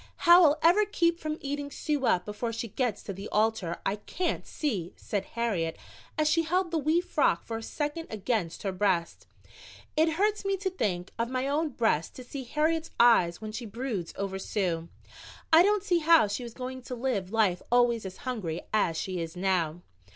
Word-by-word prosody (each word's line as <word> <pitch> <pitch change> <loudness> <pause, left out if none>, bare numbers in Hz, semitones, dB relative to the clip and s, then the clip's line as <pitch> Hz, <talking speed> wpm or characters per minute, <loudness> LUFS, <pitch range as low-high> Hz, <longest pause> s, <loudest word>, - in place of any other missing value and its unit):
"How 345 +1 +9
I'll 300 0 +4
ever 355 +6 +6
keep 340 -5 +1
from 310 -1 -3
eating 285 0 -3
Sue 290 -2 -1
up 180 0 +2
before 210 +3 -3
she 230 0 -4
gets 235 -1 -2
to 200 - -5
the 195 +2 -7
altar, 215 -5 0
I 200 - 0
can't 345 - -3
see," 200 - -3
said 205 -2 -3
Harriet, 190 -9 -1 0.4
as 305 -1 +2
she 330 +2 +3
held 350 +2 0
the 330 - +1
wee 310 +4 +2
frock 360 - +1
for 225 - -4
a - - -6
second 295 +7 -4
against 210 -5 -2
her 195 - -1
breast. 185 -3 -1 0.7
It 320 +1 +3
hurts 415 +5 +1
me 395 0 0
to 380 0 -2
the - - -22
quick 180 - -2
of 230 0 0
my 255 +1 -1
own 305 +3 0
breast 225 - 0
to 255 - -8
see 265 +1 -7
Harriet's 315 +4 0
eyes 185 -8 +5
when 215 0 -5
she 230 +2 -6
broods 215 -5 -4
over 195 -1 -3
Sue. 175 -5 -2 0.6
I 320 - +9
don't 410 +1 +3
see 355 -4 +2
how 330 -4 +6
she 205 +5 -3
is 235 -1 -9
going 260 0 -6
to 250 - -5
live 230 -7 -2
life 210 -6 +2
always 240 -2 +3
as 190 -1 -7
hungry 195 -11 -3
as 175 -6 +2
she 185 -1 -3
is 165 +1 -6
now. 175 -3 0
235 Hz, 200 wpm, -28 LUFS, 195-310 Hz, 0.7 s, How